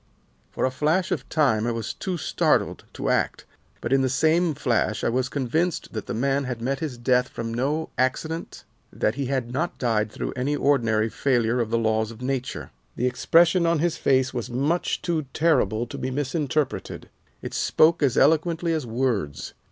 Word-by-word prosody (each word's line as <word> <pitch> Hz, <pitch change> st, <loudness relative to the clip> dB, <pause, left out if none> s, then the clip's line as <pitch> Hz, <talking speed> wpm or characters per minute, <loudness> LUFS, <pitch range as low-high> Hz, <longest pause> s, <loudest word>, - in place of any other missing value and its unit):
"For -, -, -1 dB
a 130 Hz, -, 0 dB
flash 155 Hz, +7 st, 0 dB
of 135 Hz, -6 st, -3 dB
time 120 Hz, -8 st, +2 dB
I -, -, +1 dB
was 115 Hz, -2 st, -3 dB
too 185 Hz, -2 st, -4 dB
startled -, -, 0 dB
to -, -, -3 dB
act, -, -, 0 dB, 0.4 s
but 120 Hz, -, -1 dB
in 135 Hz, -, +4 dB
the 130 Hz, -, +1 dB
same 155 Hz, +4 st, +2 dB
flash 120 Hz, -6 st, 0 dB
I -, -, +2 dB
was 130 Hz, +2 st, 0 dB
convinced 150 Hz, +6 st, -1 dB
that 110 Hz, -, -5 dB
the -, -, -3 dB
man 135 Hz, +3 st, 0 dB
had 125 Hz, -2 st, -4 dB
met 135 Hz, +3 st, -2 dB
his 145 Hz, -6 st, -4 dB
death 125 Hz, +1 st, +2 dB
from 115 Hz, 0 st, -5 dB
no 145 Hz, +7 st, -1 dB
accident, 160 Hz, +6 st, -2 dB, 0.3 s
that 105 Hz, -, 0 dB
he 135 Hz, 0 st, -3 dB
had 130 Hz, -3 st, -2 dB
not 155 Hz, +7 st, -2 dB
died 110 Hz, -4 st, 0 dB
through -, -, -4 dB
any 135 Hz, +3 st, 0 dB
ordinary 115 Hz, -7 st, +2 dB
failure 120 Hz, -1 st, +1 dB
of 115 Hz, -2 st, 0 dB
the 115 Hz, -, +1 dB
laws 110 Hz, -1 st, +1 dB
of 115 Hz, -1 st, -11 dB
nature. 130 Hz, 0 st, -3 dB, 0.2 s
The 125 Hz, -, -1 dB
expression 170 Hz, +7 st, +3 dB
on 170 Hz, 0 st, +3 dB
his 170 Hz, +2 st, 0 dB
face 130 Hz, -1 st, +2 dB
was 120 Hz, -3 st, -4 dB
much 140 Hz, +8 st, -1 dB
too 160 Hz, -5 st, -1 dB
terrible 125 Hz, -9 st, +2 dB
to -, -, -8 dB
be 130 Hz, -, -2 dB
misinterpreted. 145 Hz, +1 st, -2 dB, 0.4 s
It -, -, -6 dB
spoke 165 Hz, +1 st, +3 dB
as 135 Hz, -4 st, +2 dB
eloquently 165 Hz, +3 st, +3 dB
as 155 Hz, -6 st, -2 dB
words. 110 Hz, -, -2 dB
130 Hz, 185 wpm, -24 LUFS, 120-155 Hz, 0.4 s, in